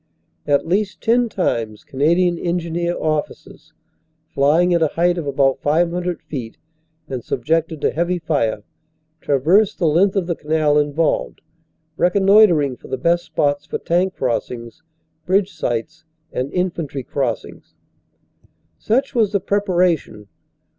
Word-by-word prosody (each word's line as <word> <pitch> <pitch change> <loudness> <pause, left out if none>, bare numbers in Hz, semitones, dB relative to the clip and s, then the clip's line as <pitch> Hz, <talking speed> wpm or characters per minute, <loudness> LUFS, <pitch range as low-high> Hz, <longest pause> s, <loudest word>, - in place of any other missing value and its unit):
At 145 -1 +2
least 195 +3 -1
ten 240 +1 +2
times 115 - -2
Canadian 170 +5 +1
Engineer 170 0 -2
officers, 155 -1 -4 0.6
flying 160 +6 +3
at 170 - +2
a 160 - +4
height 175 +3 +1
of 155 - -5
about 135 -1 +1
500 175 +3 0
feet, 120 -6 -7 0.5
and 130 -4 -5
subjected 160 0 -1
to - - +1
heavy 175 +2 -1
fire, 140 -11 -1 0.6
traversed 170 +11 +2
the 175 - 0
length 180 +6 +3
of 195 -3 +1
the 170 - -1
canal 150 -1 +1
involved, 150 +2 -1 0.6
reconnoitering 180 - +4
for - - -14
the 130 - -3
best 170 +5 +1
spots 145 -1 -1
for - - -3
tank 180 +3 0
crossings, 120 +2 -3 0.5
bridge 190 +1 +1
sites 125 +7 -3 0.3
and 130 +3 -3
infantry 165 -7 -2
crossings. 130 -3 -4 1.0
Such 265 +6 0
was 220 -5 +1
the 200 - +2
preparation. 180 - 0
165 Hz, 125 wpm, -20 LUFS, 140-180 Hz, 1.0 s, a